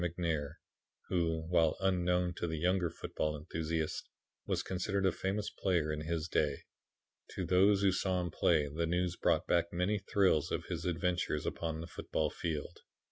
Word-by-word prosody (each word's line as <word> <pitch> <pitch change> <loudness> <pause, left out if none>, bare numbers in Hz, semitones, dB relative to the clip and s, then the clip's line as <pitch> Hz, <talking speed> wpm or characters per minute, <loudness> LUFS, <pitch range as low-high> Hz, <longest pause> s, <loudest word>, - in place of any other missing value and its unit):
McNair 80 -4 -1 0.5
who, 80 -3 0
while 80 -3 +3
unknown 90 -2 +1
to 85 - -1
the 80 -1 -2
younger 90 +1 +2
football 75 -1 -3
enthusiasts, 80 +1 -2 0.5
was - - 0
considered 95 +1 -1
a 95 - +4
famous 100 +2 -2
player 85 -5 0
in 75 - -3
his 80 0 -2
day. 75 -4 0 0.7
To - - -2
those 100 +2 +4
who 95 - +5
saw 95 0 0
him 90 -2 -2
play 75 -1 +3
the 80 +4 -2
news 90 +1 0
brought - - +2
back 85 0 +2
many 90 +4 0
thrills 95 -6 +2
of - - -2
his - - -4
adventures 90 -3 0
upon 80 -1 -3
the - - -5
football 75 -3 -2
field. 80 -4 -4
85 Hz, 165 wpm, -33 LUFS, 80-90 Hz, 0.7 s, who